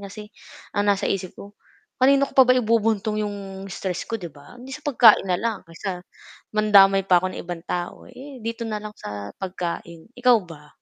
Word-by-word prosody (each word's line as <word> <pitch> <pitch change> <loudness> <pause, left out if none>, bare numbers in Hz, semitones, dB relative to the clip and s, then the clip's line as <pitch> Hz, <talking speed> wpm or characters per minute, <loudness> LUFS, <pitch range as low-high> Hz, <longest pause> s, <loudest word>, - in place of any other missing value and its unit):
kasi 210 +2 -10 0.4
ang 205 0 0
nasa 200 -1 +2
isip 185 -2 -3
ko, 200 +1 -11 0.5
"Kanino 275 +2 +5
ko - - -20
pa 265 - +7
ba 255 - +6
ibubuntong 220 -2 +1
'yong 195 -2 -6
stress 185 -1 -5
ko, 225 - -2
'di 175 -6 -9
ba, 145 - -16
eh 245 - -13
di 265 - -10
sa 280 - -7
pagkain 235 -8 +5
na 180 - +2
lang." 225 +1 -2
Kaysa 180 +2 -5 0.6
mandamay 195 -2 +5
pa 180 -2 +4
ako 185 0 -3
ng - - -6
ibang 175 -1 -6
tao, 175 0 -4
eh, 260 +1 -11
dito 230 +1 -4
na 215 -2 -3
lang 210 0 -9
sa 100 -1 -7
pagkain. 170 -2 -6
Ikaw 245 -1 +5
ba? 150 -2 -13
205 Hz, 200 wpm, -23 LUFS, 180-230 Hz, 0.6 s, pa